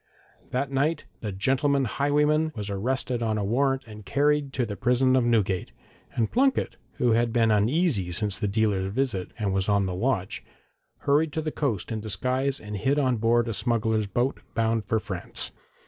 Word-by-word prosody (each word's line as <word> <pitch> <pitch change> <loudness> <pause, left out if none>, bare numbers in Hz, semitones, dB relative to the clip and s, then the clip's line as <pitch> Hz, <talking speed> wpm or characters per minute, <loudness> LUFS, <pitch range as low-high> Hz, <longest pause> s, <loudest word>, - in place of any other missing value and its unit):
That 135 +2 -2
night 145 +5 0
the 105 - -4
'gentleman 135 +7 +1
highwayman' 150 +5 +1
was 105 -2 -4
arrested 125 +4 -1
on 110 -2 0
a 105 - -1
warrant, 135 +5 +1
and 105 -1 -11
carried 145 +7 +1
to 125 - 0
the 105 -2 -5
prison 125 +3 +2
of 130 - +3
Newgate, 105 -6 +1 0.4
and 115 -2 0
Plunket, 265 +2 +2 0.2
who 120 - +1
had 115 +1 +2
been 115 -1 +3
uneasy 110 - +2
since 100 +2 -1
the 105 - 0
dealer's 100 -2 0
visit, 110 -6 -1
and 100 -4 -1
was 95 +1 0
on 100 -1 +3
the 95 - -2
watch, 95 -1 -1 0.6
hurried 150 +2 +2
to 160 - -1
the 155 - -2
coast 120 - -2
in 110 -1 -2
disguise 130 +7 0
and 105 -1 -6
hid 135 +8 +1
on 130 -4 +2
board 115 +2 +2
a 115 - -2
smuggler's 110 -2 0
boat, 120 +7 -1 0.2
bound 115 -1 +1
for 110 +3 +1
France. 95 -5 -6
115 Hz, 180 wpm, -26 LUFS, 105-135 Hz, 0.6 s, of